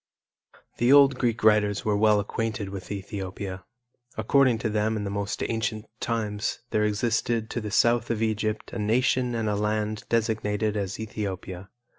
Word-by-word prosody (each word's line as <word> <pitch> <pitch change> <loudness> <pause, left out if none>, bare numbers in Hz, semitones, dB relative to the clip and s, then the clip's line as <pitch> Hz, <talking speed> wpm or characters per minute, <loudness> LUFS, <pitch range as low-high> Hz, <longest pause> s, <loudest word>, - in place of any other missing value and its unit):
The 120 +2 +3
old 140 -2 +6
Greek 115 -3 0
writers 105 -2 +3
were 105 -1 +2
well 105 0 +4
acquainted 110 0 -3
with 95 0 -7
Ethiopia. 95 -1 -5 0.5
According 125 +2 +3
to - - +2
them 110 +1 0
in 105 - -3
the 100 - -3
most 100 0 -3
ancient 110 -1 -2
times 105 -3 -2
there 105 - +2
existed 115 +1 0
to 120 - -2
the 105 - -4
South 115 +2 +3
of 115 -1 0
Egypt 110 0 -2
a 120 - -4
nation 120 +3 +1
and 115 -1 -1
a 105 - +1
land 105 +1 -1
designated 110 -2 0
as 100 -1 -3
Ethiopia. 95 -4 -5
110 Hz, 160 wpm, -26 LUFS, 105-115 Hz, 0.5 s, old